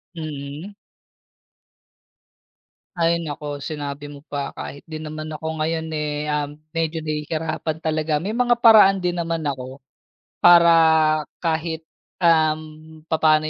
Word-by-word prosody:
Mhm. 155 +4 -7 2.2
Ay, 170 0 +2
naku 150 0 -6
sinabi 145 0 -6
mo 145 -1 -10
pa 140 -1 -4
kahit 140 - -8
din 155 -1 -7
naman 155 0 -6
ako 160 +1 -4
ngayon 160 +1 -1
eh, 150 0 -3
um, 145 -1 -1 0.2
medyo 160 0 -1
nahihirapan 155 +1 -3
talaga 155 -1 0
may 215 +6 -3
mga 245 -1 +4
paraan 205 -4 +7
din 175 0 -1
naman 165 -1 -2
ako 130 0 -7 0.6
para 170 -1 +7 0.7
kahit, 160 -1 -1 0.4
um, 155 -1 +1
papaano 155 -1 +4
155 Hz, 115 wpm, -22 LUFS, 150-165 Hz, 2.2 s, paraan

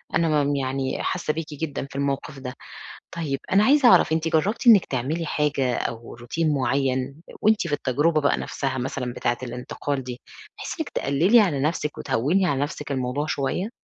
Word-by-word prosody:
أنا 155 -3 +2
م 145 0 0
يعني 135 0 -2
حاسّة 175 -4 -1
بيكِ 165 +1 -4
جدًا 145 -2 -4
في - - -14
الموقِف 140 +1 -2
ده. 125 -1 -6 0.6
طيب، 155 -5 -2
أنا 200 +2 +5
عايزة 275 +1 +5
أعرَف، 160 - +5
أنتِ 165 0 +1
جرّبتِ 190 +10 0
إنِك 215 -6 +8
تعملي 145 +6 -2
حاجة 140 -5 0
أو 115 0 -5
روتين 150 +7 -1
معيّن، 135 -1 0 0.3
وأنتِ 215 -4 +3
في 150 - -5
التجربة 150 +5 +1
بقى 145 - +2
نَفْسها 135 -2 -3
مثلًا 125 -1 -3
بتاعة 120 0 -1
الانتقال 125 +3 -4
دي، 125 -1 -7 0.4
بحيث - - -5
إنِك 315 - -2
تقلّلي 170 - +3
على 165 -10 +1
نَفْسِك 150 0 -1
وتهوِّني 140 +9 +1
على 140 -5 0
نَفْسِك 145 0 -4
الموضوع 130 +3 -2
شوية؟ 155 +8 -2
145 Hz, 175 wpm, -24 LUFS, 130-165 Hz, 0.6 s, إنِك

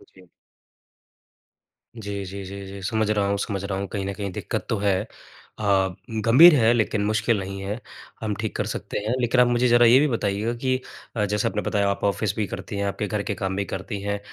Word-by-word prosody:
जी। 95 - -16 1.8
जी, 100 -1 -4
जी, 100 +1 -7
जी, 100 +1 -7
जी, 100 0 -8
समझ 110 +2 0
रहा 105 -2 +1
हूँ, 100 0 0
समझ 100 -1 -3
रहा 100 -1 -2
हूँ। 100 - -3
कहीं 100 -2 -4
न 100 - -3
कहीं 100 -1 -4
दिक्कत - - -4
तो 110 - +1
है 100 -2 +2 0.6
अ, - - -5 0.6
गंभीर 150 +9 +9
है 115 -3 +4
लेकिन 110 -2 +1
मुश्किल 110 +1 +1
नहीं 95 0 -5
है, 105 +4 -4 0.4
हम 110 -2 -1
ठीक 110 - -3
कर - - -1
सकते - - -4
हैं। 110 +3 -1
लेकिन 125 +1 +3
आप 125 - +5
मुझे 120 +1 +2
ज़रा 120 0 +6
ये 125 +3 +7
भी 150 - +3
बताइएगा 110 -2 -1
कि 130 0 +2 0.4
अ, 105 -2 +1
जैसे 105 +1 0
आपने 105 - -1
बताया 100 -2 +1
आप 100 - -3
ऑफ़िस 100 0 0
भी 105 - +1
करती 100 +3 -6
हैं, 100 - -1
आपके 100 +1 -2
घर 105 0 -2
के - - -2
काम 95 -1 -2
भी 100 - -1
करती 100 +2 -5
हैं, 100 0 -2
105 Hz, 220 wpm, -24 LUFS, 100-115 Hz, 1.8 s, गंभीर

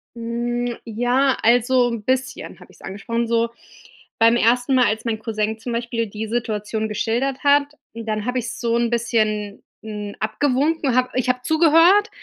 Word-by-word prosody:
Hm, 240 +1 -3
ja, 245 +4 +1
also 245 +2 +3
'n 230 -3 -5
bisschen 260 +2 -3
habe - - -16
ich's - - -21
angesprochen. 230 +4 -3
So 230 0 +1 0.7
beim 230 +1 +5
ersten 245 +3 +2
Mal, 250 -1 +4
als 220 +1 -1
mein 225 -2 -2
Cousin 220 -1 -3
zum 240 +2 -6
Beispiel 235 -1 -2
die 210 +2 -6
Situation 220 -1 -2
geschildert 235 +6 -2
hat, 285 0 +4 0.3
dann 220 -2 -4
habe 250 +1 -1
ich's 235 -1 -6
so 235 -1 0
'n 235 0 +1
bisschen, 215 -3 -1 0.2
hm, 210 -2 -6
abgewunken. 275 +4 0
Habe 255 0 +2
ich 255 0 -1
habe 250 0 0
zugehört, 330 - +4
235 Hz, 160 wpm, -21 LUFS, 220-255 Hz, 0.7 s, beim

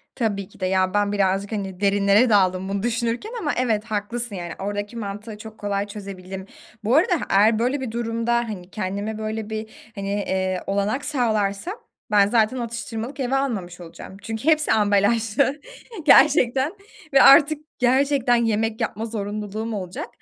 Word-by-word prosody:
Tabii 205 -5 -2
ki - - -20
de 185 - -1
ya, 185 0 +1
ben 205 0 +1
birazcık, 195 0 0
hani, 195 -4 -4
derinlere 200 +3 +3
daldım 190 -2 +2
bunu 200 0 -2
düşünürken 235 - -2
ama 300 -9 -1
evet, 225 -4 +1
haklısın, 225 +1 -2
yani, 175 -2 -5
oradaki 205 +3 -4
mantığı 210 0 -6
çok 220 0 -11
kolay 205 0 -2
çözebildim. 190 -2 -8 0.4
Bu 225 +5 +2
arada 345 +4 +4
h - - -4
eğer 215 +3 +4
böyle 255 +4 0
bir 255 - -4
durumda, 230 0 -1
hani, 215 -7 -3
kendime 205 +2 -3
böyle 220 0 -4
bir, 220 0 -8
hani, 200 -1 -4
eee, 190 -2 -1
olanak 200 +7 -1
sağlarsam 220 - 0 0.4
ben, 200 -1 +5
zaten 225 +2 +2
atıştırmalık 235 +2 -5
eve 265 0 0
almamış 205 -11 -2
olacağım 175 +3 -11
çünkü 225 +3 -6
hepsi 310 -1 +3
ambalajlı, 220 +6 +2 0.4
gerçekten. 270 -1 +5 0.4
Ve 270 - +7
artık 295 +2 +7 0.2
gerçekten 260 0 +3
yemek 225 -1 0
yapma 220 - -2
zorunluluğum 215 0 -4
olacak. 185 -3 -5
215 Hz, 155 wpm, -23 LUFS, 200-240 Hz, 0.4 s, Ve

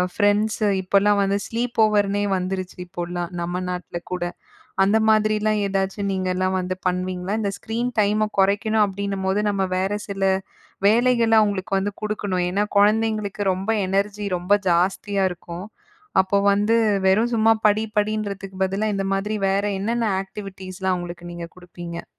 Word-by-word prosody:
Friends 210 +1 +2
இப்போலாம் 200 +2 +3
வந்து 195 0 +1
sleep 240 +1 -3
ஓவர்னே 205 -1 +1
வந்துருச்சு 185 0 -4
இப்போலாம், 175 -1 -4
நம்ம 175 +1 -2
நாட்ல 180 -1 -5
கூட. 180 -1 -2 0.6
அந்த 200 +3 +3
மாதிரிலாம் 215 0 +2
ஏதாச்சும் 195 0 -1
நீங்கலாம் 185 0 0
வந்து 185 0 -3
பண்ணுவீங்களா? 180 +1 -2
இந்த 200 -2 -1
ஸ்க்ரீன் 235 +3 -2
டைம 210 +1 +2
கொறைக்கணும் 210 +2 +3
அப்படின்னும்போது, 195 0 -2
நம்ம 200 -1 0
வேற 190 +2 0 0.2
சில 195 -1 -3 0.6
வேலைகள 235 +1 +3
அவுங்களுக்கு 200 -2 0
வந்து 195 +2 -1
குடுக்கணும். 205 -4 -1
ஏன்னா 200 +3 +1
குழந்தைங்களுக்கு 215 0 +2
ரொம்ப 190 +3 -5 0.2
எனர்ஜி, 200 +2 -1
ரொம்ப 180 +3 +1 0.2
ஜாஸ்தியா 190 +3 +1
இருக்கும். 175 +1 -8 0.6
அப்போ 190 +1 0 0.2
வந்து 210 +3 +2 0.3
வெறும் 220 +6 +3
சும்மா 225 0 +5
படி, 210 +1 +2 0.2
படின்றதுக்கு 205 -2 -3
பதிலா, 195 +3 -1
இந்த 195 0 -1
மாதிரி 205 +2 -1
வேற 195 +1 +1 0.2
என்னென்ன 230 +3 0
ஆக்டிவிட்டீஸ்லாம் 190 -1 -5
அவுங்களுக்கு 175 0 -7
நீங்க 170 -1 -6
குடுப்பீங்க? 175 -1 -8
200 Hz, 135 wpm, -22 LUFS, 185-210 Hz, 0.6 s, சும்மா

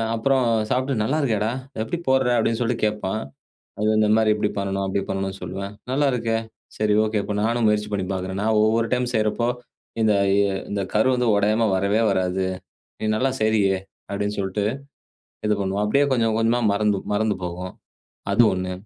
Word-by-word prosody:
அப்பறம் 130 +3 +2 0.3
சாப்பிட்டு 130 +1 0
நல்லா 135 +8 0
இருக்கேடா! 110 -4 0 0.3
எப்பிடி 115 +10 -2
போட்ற 130 -1 +3
அப்பிடின்னு 115 0 +1
சொல்லிட்டு 120 -1 -1
கேட்பான். 105 0 -2 0.6
அது 105 - -1
வந்து 110 0 +3
இந்தமாரி 110 0 +4
இப்பிடி 105 -1 0
பண்ணணும், 100 0 -1
அப்பிடி 95 +1 -1
பண்ணணுன்னு 95 0 -3
சொல்லுவேன். 100 +2 -5 0.2
நல்லா 145 +2 +2
இருக்கே! 115 -2 0 0.4
சரி, 105 -1 +2
ஓகே. 110 0 -1
இப்ப 105 - -3
நானும் 115 +1 +1
முயற்சி 105 0 +1
பண்ணி 95 -2 -1
பார்க்கிறேன். 95 +1 -4
நான் 110 +1 +2
ஒவ்வொரு 115 +1 +2
டைம் 125 0 0
செய்றப்போ, 110 +2 +1 0.6
இந்த 110 - +4
அ - - +1 0.4
இந்த 100 -1 -2
கரு 110 +4 +3
வந்து 125 -1 0
உடையாம 110 +2 +2
வரவே 100 +4 +1
வராது. 95 0 0 0.5
நீ - - -3
நல்லா 130 +4 +1
செய்றியே! 105 -3 +2 0.3
அப்பிடின்னு 100 +1 -2
சொல்ட்டு, 100 +1 -1 0.8
இது 105 - +3
பண்ணுவோம். 100 +1 -1
அப்பிடியே 140 +7 +3
கொஞ்சம் 115 -3 +1
கொஞ்சமா 115 +2 +2
மறந்து, 105 0 +1 0.2
மறந்து 105 0 +1
போகும். 90 +1 -5 0.6
அது 105 - +5
1 95 0 -3
105 Hz, 170 wpm, -23 LUFS, 100-115 Hz, 0.8 s, அது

